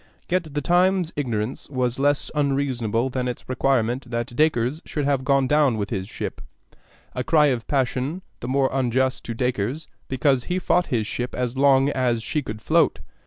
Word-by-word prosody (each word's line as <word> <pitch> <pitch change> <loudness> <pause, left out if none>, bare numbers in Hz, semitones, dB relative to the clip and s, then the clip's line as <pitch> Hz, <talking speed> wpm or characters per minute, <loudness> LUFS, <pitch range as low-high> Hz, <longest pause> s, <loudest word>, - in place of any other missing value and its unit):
Yet 170 -5 -1
the 145 - 0
Times's 180 +1 +2
ignorance 120 -4 -3
was 125 -2 -1
less 145 +1 +1
unreasonable 130 -5 0
than 125 0 -2
its 125 - -5
requirement 130 -1 0
that 120 0 -3
Dacres 150 0 +1
should 150 -2 -3
have 140 -2 +1
gone 135 0 +3
down 145 -4 +3
with 100 -1 -3
his 95 -2 -3
ship, - - -5 0.7
a 125 - -2
cry 150 +2 +4
of 115 -2 -5
passion 135 +5 -1 0.2
the 120 - -6
more 135 +1 +2
unjust 130 0 0
to 115 - -4
Dacres 125 +4 -2 0.2
because 130 -1 +1
he 180 - -1
fought 180 -1 +1
his 115 -4 0
ship 125 +3 -4
as 125 0 -2
long 135 0 +4
as 125 -5 0
she 150 - -1
could 110 -4 -7
float. - - +3
130 Hz, 175 wpm, -23 LUFS, 120-145 Hz, 0.7 s, cry